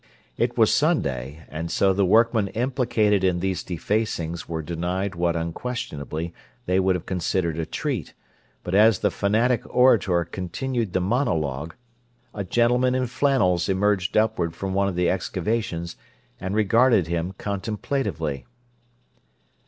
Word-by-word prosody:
It -, -, -1 dB
was -, -, +4 dB
Sunday, 70 Hz, +4 st, 0 dB
and 80 Hz, +2 st, -5 dB
so 95 Hz, +2 st, +2 dB
the 100 Hz, +1 st, +1 dB
workmen 115 Hz, 0 st, +4 dB
implicated 115 Hz, -4 st, +1 dB
in 90 Hz, -2 st, +2 dB
these 95 Hz, 0 st, -1 dB
defacings 85 Hz, -3 st, -2 dB
were 80 Hz, -1 st, -3 dB
denied 90 Hz, +4 st, -2 dB
what 85 Hz, 0 st, 0 dB
unquestionably 85 Hz, -, -4 dB, 0.3 s
they 90 Hz, +1 st, +2 dB
would 95 Hz, 0 st, +2 dB
have 90 Hz, -, -5 dB
considered 85 Hz, -2 st, -1 dB
a 80 Hz, -, -2 dB
treat; 135 Hz, -, -3 dB, 0.5 s
but 90 Hz, -, -5 dB
as 105 Hz, +1 st, +6 dB
the -, -, +3 dB
fanatic 115 Hz, +4 st, +1 dB
orator 100 Hz, -9 st, +3 dB
continued 105 Hz, -, -3 dB
the 95 Hz, -, +1 dB
monologue, 85 Hz, -, -1 dB, 0.6 s
a 100 Hz, -, -3 dB
gentleman 120 Hz, +5 st, +2 dB
in 130 Hz, 0 st, +1 dB
flannels 115 Hz, -, +1 dB
emerged 95 Hz, 0 st, +1 dB
upward 100 Hz, -7 st, +1 dB
from 95 Hz, +2 st, -4 dB
one 100 Hz, +1 st, +2 dB
of 95 Hz, -, -2 dB
the 90 Hz, 0 st, +1 dB
excavations, 95 Hz, -3 st, -2 dB, 0.4 s
and 95 Hz, +2 st, -3 dB
regarded 110 Hz, -1 st, +4 dB
him 85 Hz, +3 st, -3 dB
contemplatively. 100 Hz, -, -3 dB
95 Hz, 135 wpm, -24 LUFS, 85-110 Hz, 0.6 s, as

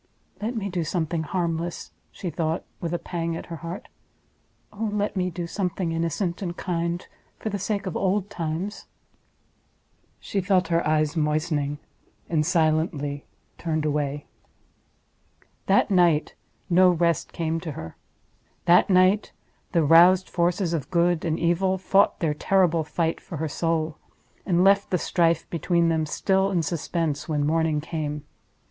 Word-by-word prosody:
"Let 230 Hz, +4 st, -2 dB
me 205 Hz, -3 st, -2 dB
do 180 Hz, -3 st, -2 dB
something 165 Hz, 0 st, -1 dB
harmless!" 170 Hz, 0 st, -3 dB, 0.2 s
she 180 Hz, -, -5 dB
thought, 160 Hz, 0 st, -1 dB, 0.2 s
with 170 Hz, -, -3 dB
a 175 Hz, -, 0 dB
pang 170 Hz, -1 st, -3 dB
at -, -, -6 dB
her -, -, -5 dB
heart—"oh 200 Hz, +4 st, -9 dB
let 205 Hz, 0 st, -1 dB
me 180 Hz, -1 st, 0 dB
do 175 Hz, 0 st, -5 dB
something 180 Hz, -1 st, -2 dB
innocent 170 Hz, +3 st, -2 dB
and 175 Hz, -2 st, -4 dB
kind 170 Hz, -1 st, -2 dB, 0.3 s
for 220 Hz, -, -4 dB
the 200 Hz, -1 st, -3 dB
sake 200 Hz, +1 st, -2 dB
of 185 Hz, -, -4 dB
old 195 Hz, +1 st, +1 dB
times!" 175 Hz, +1 st, -4 dB, 1.3 s
She 200 Hz, -, -2 dB
felt 185 Hz, 0 st, +2 dB
her 170 Hz, 0 st, +2 dB
eyes 155 Hz, 0 st, +1 dB
moistening, 150 Hz, -2 st, 0 dB, 0.5 s
and 155 Hz, -3 st, +1 dB
silently 155 Hz, -3 st, 0 dB, 0.3 s
turned 155 Hz, -2 st, -1 dB
away. 145 Hz, -1 st, -1 dB, 1.4 s
That 195 Hz, +1 st, +3 dB
night 175 Hz, -5 st, +3 dB, 0.3 s
no 185 Hz, 0 st, +5 dB
rest 170 Hz, -2 st, +1 dB
came 165 Hz, 0 st, -2 dB
to 160 Hz, -2 st, -6 dB
her. 80 Hz, -9 st, -8 dB, 0.7 s
That 175 Hz, +3 st, +5 dB
night 185 Hz, +2 st, +3 dB, 0.4 s
the 170 Hz, -2 st, +3 dB
roused 175 Hz, +5 st, +6 dB
forces 175 Hz, 0 st, 0 dB
of 150 Hz, -5 st, -3 dB
Good 175 Hz, -1 st, +2 dB
and 160 Hz, -1 st, 0 dB
Evil 185 Hz, +3 st, +1 dB
fought 195 Hz, +1 st, +2 dB
their 160 Hz, -3 st, +1 dB
terrible 170 Hz, 0 st, +2 dB
fight 165 Hz, +1 st, -1 dB
for 170 Hz, -, -7 dB
her 160 Hz, +2 st, -2 dB
soul—and 165 Hz, +3 st, -2 dB
left 200 Hz, +1 st, +4 dB
the 180 Hz, -, +2 dB
strife 165 Hz, -1 st, +1 dB
between 170 Hz, +1 st, +1 dB
them 160 Hz, -1 st, 0 dB
still 190 Hz, +4 st, +1 dB
in 175 Hz, -4 st, 0 dB
suspense 160 Hz, -2 st, -2 dB
when 145 Hz, -2 st, +1 dB
morning 160 Hz, 0 st, +1 dB
came. 150 Hz, -2 st, -4 dB
170 Hz, 145 wpm, -25 LUFS, 160-185 Hz, 1.4 s, roused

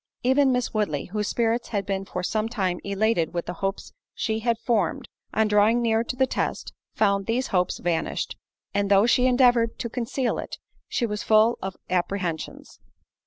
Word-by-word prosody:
Even 265 Hz, +2 st, +4 dB
Miss 250 Hz, -1 st, -1 dB
Woodley, 200 Hz, -10 st, -1 dB
whose 210 Hz, -1 st, -1 dB
spirits 235 Hz, 0 st, 0 dB
had 205 Hz, -4 st, -2 dB
been 195 Hz, -1 st, -2 dB
for 180 Hz, -2 st, -5 dB
some 215 Hz, +3 st, -1 dB
time 190 Hz, -6 st, -1 dB
elated 200 Hz, -4 st, 0 dB
with 170 Hz, -, -2 dB
the 175 Hz, -, -4 dB
hopes 195 Hz, 0 st, -3 dB, 0.2 s
she 220 Hz, -1 st, -1 dB
had 230 Hz, 0 st, 0 dB
formed, 225 Hz, -6 st, 0 dB, 0.2 s
on 220 Hz, +1 st, +2 dB
drawing 210 Hz, +3 st, +4 dB
near 225 Hz, -1 st, +2 dB
to 245 Hz, -, -4 dB
the 265 Hz, +1 st, +3 dB
test, -, -, -3 dB, 0.2 s
found 200 Hz, -2 st, +2 dB
those 245 Hz, +3 st, 0 dB
hopes 180 Hz, -2 st, +1 dB
vanished; 170 Hz, -2 st, -2 dB, 0.4 s
and 200 Hz, 0 st, 0 dB
though 200 Hz, +1 st, +5 dB
she 250 Hz, +1 st, +4 dB
endeavoured 245 Hz, -2 st, +3 dB
to 235 Hz, -, -4 dB
conceal 250 Hz, +1 st, -1 dB
it, -, -, -6 dB, 0.3 s
she 240 Hz, -, 0 dB
was 210 Hz, -2 st, -3 dB
full 220 Hz, +2 st, +4 dB
of 190 Hz, -1 st, -4 dB
apprehensions. 180 Hz, -2 st, -3 dB
215 Hz, 175 wpm, -25 LUFS, 195-235 Hz, 0.4 s, though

